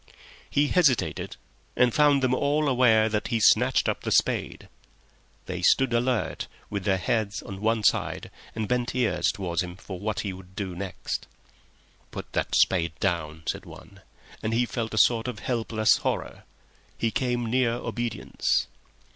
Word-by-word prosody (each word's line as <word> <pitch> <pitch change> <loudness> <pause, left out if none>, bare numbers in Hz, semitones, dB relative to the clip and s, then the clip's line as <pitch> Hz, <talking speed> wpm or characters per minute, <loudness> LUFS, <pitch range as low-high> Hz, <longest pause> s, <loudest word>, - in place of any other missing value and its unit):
He 145 0 +2
hesitated, 150 -9 +1 0.4
and 125 -2 +3
found 145 -2 +4
them 130 -1 +2
all 145 +3 +1
aware 120 -4 +4
that 105 -1 -1
he - - -2
had 110 - +1
snatched - - +4
up - - -1
the - - -3
spade. - - +1 0.8
They - - -5
stood 130 -3 +3
all 120 - +4
alert, 125 -2 -1 0.2
with 100 -2 -3
their 95 -2 +2
heads 100 +2 -1
on 95 -1 -8
one 110 0 +1
side, - - 0 0.2
and 110 -1 -2
bent 125 +1 -1
ears 125 -3 +1
towards 85 -4 -2
him 90 -1 -6
for 95 -1 -8
what 105 -2 -2
he 100 -3 -4
would 95 0 -13
do 95 -4 -4
next. 95 0 -5 0.8
"Put - - -8
that - - -1
spade 85 -3 +3
down," 80 -2 -2
said - - -3
one, - - -13 0.4
and 110 +1 -1
he 120 +1 +3
felt 115 -2 -4
a - - -4
sort 115 +1 +4
of 125 -4 -4
helpless 115 -3 +1
horror. - - -3 0.5
He 115 - 0
came 120 -1 -1
near 120 0 +1
obedience. 120 -1 -1
110 Hz, 165 wpm, -26 LUFS, 100-125 Hz, 0.8 s, found